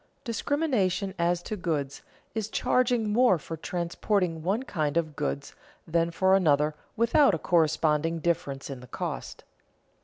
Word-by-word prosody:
_Discrimination 230 - 0
as 170 +1 +1
to 215 - -4
goods 155 -7 -3 0.3
is 220 -2 -3
charging 240 -3 +1
more 240 -5 +5
for 165 +1 -7
transporting 170 +1 -1
one 200 +9 0
kind 155 - -1
of 155 -3 -1
goods 145 -1 -3 0.3
than 165 +1 +1
for 190 +3 +2
another 150 -4 +3 0.2
without 235 - +4
a - - -2
corresponding 160 -1 +2
difference 145 -5 -2
in 135 - -6
the 125 - -12
cost. - - -5
170 Hz, 140 wpm, -27 LUFS, 155-210 Hz, 0.3 s, more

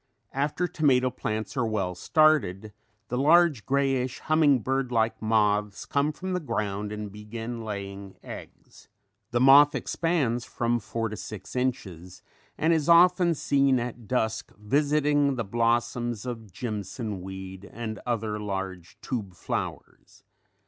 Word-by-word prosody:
After 150 +6 0
tomato 130 -6 +2
plants 110 +4 -4
are 125 -3 +1
well 100 -4 -1
started 110 - +2 0.4
the 125 - -1
large 155 -4 +4
greyish 135 -2 +1
humming 150 -5 +3
bird 135 +1 -1
like 110 -1 +1
moths 105 -2 +1
comes 145 +2 0
from 185 0 -4
the 180 - 0
ground 105 - -3
and 105 -1 -5
begin 115 +3 -6
laying 100 -2 -6
eggs. - - -11 0.4
The 120 - 0
moth 140 +3 +7
expands 140 -9 0
from 120 0 -1
four 115 +1 -3
to 110 - -5
six 110 +1 -8
inches 95 -9 -3 0.3
and 160 +2 +3
is 160 -1 0
often 175 0 +6
seen 140 -2 +2
at 120 -2 -6
dusk 110 -2 -1
visiting 145 +4 +2
the 115 - -2
blossoms 120 +1 0
of 115 -5 -6
"jimson 105 -1 -5
weed" 95 +1 -8
and 110 -2 -5
other 110 -3 -2
large 95 -4 -5
tube 105 -8 -4
flowers. - - -6
120 Hz, 135 wpm, -27 LUFS, 105-140 Hz, 0.4 s, moth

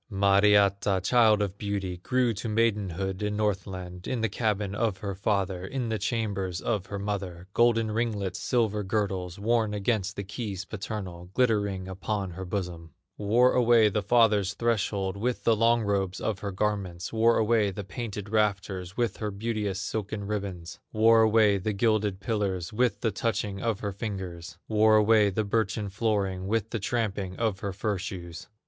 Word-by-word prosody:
Mariatta, 100 -1 +4
child 110 -2 +4
of 100 0 -5
beauty, 100 -3 -3
Grew 125 +6 +1
to 110 +3 -5
maidenhood 100 -4 0
in 105 0 -1
Northland, 95 -3 -3
In 125 -3 -2
the 115 - +1
cabin 105 -2 -1
of 105 -2 0
her 100 0 -4
father, 95 -2 -1
In 120 +4 -3
the 110 -1 -1
chambers 100 -5 -2
of 100 -4 -2
her 100 -1 -4
mother, 100 -4 -4
Golden 115 -2 +3
ringlets, 105 -5 -2
silver 110 -4 +1
girdles, 95 -4 -2
Worn 110 0 +1
against 100 -1 -1
the 100 - -4
keys 100 -2 -5
paternal, 95 -4 -6
Glittering 100 -6 +1
upon 95 +1 -3
her 95 +2 -6
bosom; 90 -4 -5 0.2
Wore 115 +5 +3
away 120 -3 +5
the 105 +1 -1
father's 105 -2 +3
threshold 100 -4 0
With 120 +4 -2
the 115 - +4
long 115 +1 +3
robes 100 -2 -1
of 105 -3 -2
her 100 - -4
garments; 95 -3 -2
Wore 115 +1 +4
away 110 -2 +3
the 100 +1 -5
painted 105 +1 -6
rafters 100 -4 -1
With 120 -2 0
her 105 - -3
beauteous 105 -1 -2
silken 105 +1 -4
ribbons; 95 -5 -5
Wore 115 +1 +5
away 110 -2 +4
the 105 +3 -2
gilded 105 -2 +1
pillars 100 -3 -2
With 125 +2 +1
the 115 - +1
touching 100 -2 -2
of 115 -3 -1
her 100 - -2
fingers; 95 -5 -6
Wore 110 0 +4
away 105 -1 +5
the 105 +3 -1
birchen 105 -1 -1
flooring 95 -3 -1
With 110 +1 -1
the 115 - -2
tramping 100 -4 -2
of 110 -4 0
her 100 - -3
fur 100 0 -2
shoes. 85 -3 -7
105 Hz, 165 wpm, -27 LUFS, 95-110 Hz, 0.2 s, away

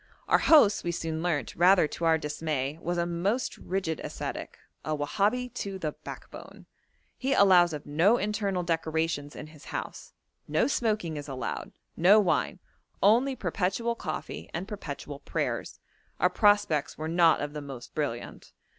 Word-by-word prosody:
Our - - +4
host, 220 -10 +5
we 175 - -1
soon 160 -1 -3
learnt, 160 -7 -1
rather 180 -1 +5
to 170 - -4
our 165 -1 +4
dismay, 150 -1 -3
was 175 0 -2
a 170 - +1
most 190 +8 -1
rigid 180 -4 -2
ascetic - - -6 0.3
a 155 -1 -2
Wahabi 215 +11 0
to 195 -4 -4
the 155 -5 -2
backbone. - - -11 0.5
He 270 +1 +1
allows 180 -3 +6
of 150 -2 -6
no 170 +11 +3
internal 200 -3 -1
decorations 160 -3 -1
in - - -7
his 155 -1 -15
house; - - -6 0.3
no - - +2
smoking 215 - -1
is 145 - -6
allowed, 130 -4 -5 0.2
no 190 +6 +6
wine, 195 -4 +1 0.5
only 245 +7 +4
perpetual 225 +2 -1
coffee 230 - -6
and 185 +3 -4
perpetual 145 -8 -7
prayers; - - -3 0.4
our - - +3
prospects 205 -8 +2
were 155 - -4
not 165 0 +4
of 145 0 -4
the 150 - -5
most 135 -4 -9
brilliant. 130 -6 -4
170 Hz, 155 wpm, -28 LUFS, 150-205 Hz, 0.5 s, allows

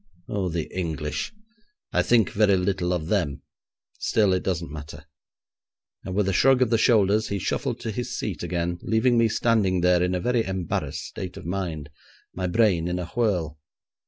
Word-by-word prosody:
'Oh, 95 -3 -1
the 85 -1 -2
English! 80 -4 -3 0.6
I - - +4
think 115 -3 +3
very 100 -2 +3
little 90 -1 0
of 85 -3 -1
them. 85 -7 -1 0.6
Still, 105 -4 +2
it 90 - +1
doesn't 85 -5 -2
matter,' 75 -1 -9 1.0
and 95 - -5
with 100 -1 +2
a 95 - +1
shrug 130 +5 +5
of 120 - -2
the 115 - +3
shoulders 110 -2 +3
he 100 - -2
shuffled 95 - -2
to 115 -2 -3
his 120 +3 -4
seat - - -4
again, 85 0 -2
leaving 115 +3 +2
me 115 -1 +4
standing 105 -6 +2
there 90 0 +4
in 90 +1 +1
a - - 0
very 120 +3 +1
embarrassed 95 -4 -3
state 95 -1 -7
of - - -9
mind; 85 -5 -4 0.4
my 90 0 -2
brain 90 -4 +2
in 90 0 -1
a 90 - -3
whirl. 90 -10 -1
95 Hz, 180 wpm, -25 LUFS, 85-110 Hz, 1.0 s, shrug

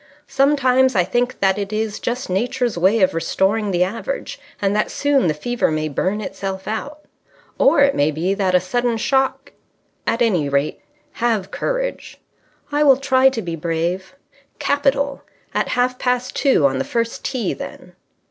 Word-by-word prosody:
Sometimes 260 -3 +3
I 180 - +4
think 245 +6 -1
that 195 0 +2
it 200 0 -4
is 215 0 -2
just 250 +2 -3
Nature's 240 +5 -1
way 190 +6 +3
of 185 0 +3
restoring 195 +6 0
the 180 -2 +2
average, 230 - -4 0.2
and 200 0 0
that 210 - +1
soon 285 -7 +1
the 155 - +2
fever 240 +10 -1
may 155 0 -1
burn 190 +8 -1
itself 190 -2 -5
out. 285 +8 -5 0.6
Or 285 +2 +5
it 280 0 +5
may 145 +1 +2
be 165 +5 -1
that 190 -2 +1
a - - +6
sudden 235 +6 -1
shock... 270 +3 0 0.6
At 235 +1 +2
any 175 -11 +1
rate, 140 +2 -1 0.3
have 225 -5 -1
courage." - - -3 0.5
"I 290 +1 +1
will 275 -3 +6
try 265 -1 +4
to 235 -5 -4
be 170 -2 -4
brave." 170 - -3 0.4
"Capital! 280 0 0 0.3
At - - 0
half 250 0 +1
past 250 0 -1
two 265 - +3
on 135 -1 +2
the - - 0
first 230 -1 -2
tee, 255 -4 -2
then." - - -9
225 Hz, 165 wpm, -20 LUFS, 185-260 Hz, 0.6 s, a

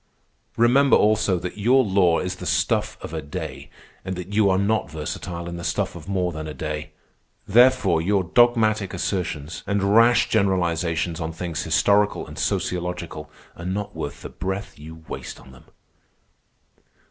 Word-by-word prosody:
Remember, 130 +4 +5
also, 105 -3 +2
that 90 +4 -6
your 130 +5 +4
law 95 -5 +3
is 90 0 -3
the - - -6
stuff - - 0
of - - -7
a - - -3
day, 70 - -7 0.3
and 95 0 -4
that 90 +3 -7
you 105 -1 +4
are 95 - +3
not 105 +3 0
versatile 85 +3 -5
in 85 0 -5
the 85 - -7
stuff 85 - -1
of - - -10
more 90 -2 0
than 80 -1 -6
a 75 - -7
day. 75 +1 -4 0.6
Therefore 120 -7 +4
your 100 +2 +1
dogmatic 110 -1 +2
assertions 85 -5 -3
and 100 0 +1
rash 115 +1 +5
generalizations 85 -5 0
on 80 0 -3
things 85 -1 -4
historical 100 +5 +2
and - - -10
sociological 90 -3 -3 0.3
are 85 - -10
not 95 +3 -3
worth - - -6
the - - -6
breath 95 -1 -5
you 80 +1 -11
waste - - -7
on 65 - -15
them." 65 - -17
90 Hz, 160 wpm, -23 LUFS, 85-105 Hz, 0.6 s, Remember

